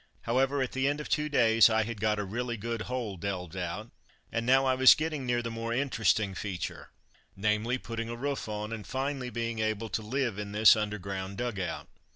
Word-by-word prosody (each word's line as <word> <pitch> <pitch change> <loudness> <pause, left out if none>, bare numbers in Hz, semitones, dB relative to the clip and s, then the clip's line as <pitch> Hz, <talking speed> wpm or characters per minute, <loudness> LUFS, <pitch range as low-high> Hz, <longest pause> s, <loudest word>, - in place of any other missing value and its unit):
However, 135 +3 +1
at 130 - -4
the 130 +1 0
end 145 +1 0
of 150 - -6
two 150 -1 +1
days, 115 -5 +5
I 110 0 +2
had 110 -2 -6
got 105 -1 +2
a 105 - -1
really 120 +4 -3
good 115 +1 -3
hole 120 -6 -3
delved 90 -1 -4
out, 95 +5 -4 0.4
and 115 +1 -2
now 135 +1 +5
I 130 - +3
was 130 0 +8
getting 155 -4 -3
near 120 0 +1
the 115 - -3
more 115 0 -3
interesting 110 -6 +1
feature, 95 -1 -5 0.5
namely, 105 +4 0
putting 115 -2 -5
a 120 - -4
roof 140 -1 -3
on, 105 +1 -4
and 110 -2 -7
finally 135 0 -2
being 115 -1 -3
able 110 0 -1
to 110 - -2
live 120 -1 -2
in 100 -1 -5
this 105 +1 +7
under 105 -1 -2
ground 95 0 -5
dug 120 -4 -2
out. 95 - -4
115 Hz, 210 wpm, -29 LUFS, 105-130 Hz, 0.5 s, was